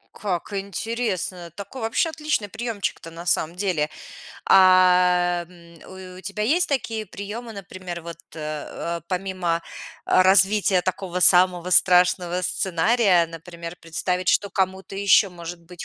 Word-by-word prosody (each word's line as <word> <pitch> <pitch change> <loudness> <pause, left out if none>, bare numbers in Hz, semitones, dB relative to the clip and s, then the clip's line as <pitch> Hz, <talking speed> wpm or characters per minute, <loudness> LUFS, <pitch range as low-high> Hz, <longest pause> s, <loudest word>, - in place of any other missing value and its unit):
Как 200 0 -4
интересно. 195 -2 -3
Такой 215 +5 -8
вообще 225 +9 0
отличный 300 -9 -2
приёмчик-то 220 -6 -5
на 170 +1 -10
самом 170 -1 0
деле. 180 -6 -1 0.6
А, 180 -2 +4
м, 170 -2 -17 0.4
у - - -11
у - - -10
тебя 200 +2 -5
есть 320 +11 +2
такие 225 -5 -2
приёмы, 215 +5 -7
например, 185 -3 -8
вот, 170 0 -9 0.2
э - - -9 0.6
э, - - -15
помимо, 180 -3 -2 0.4
э, 185 - +4
развития 190 0 +4
такого 185 -1 -3
самого 180 -1 +5
страшного 180 -1 +4
сценария, 185 +1 +2
например, 170 +1 -9
представить, 180 +3 -2
что 200 - +2
кому-то 190 0 -2
ещё 200 0 +4
может 170 0 -9
быть 175 0 -10
185 Hz, 135 wpm, -23 LUFS, 175-200 Hz, 0.6 s, самого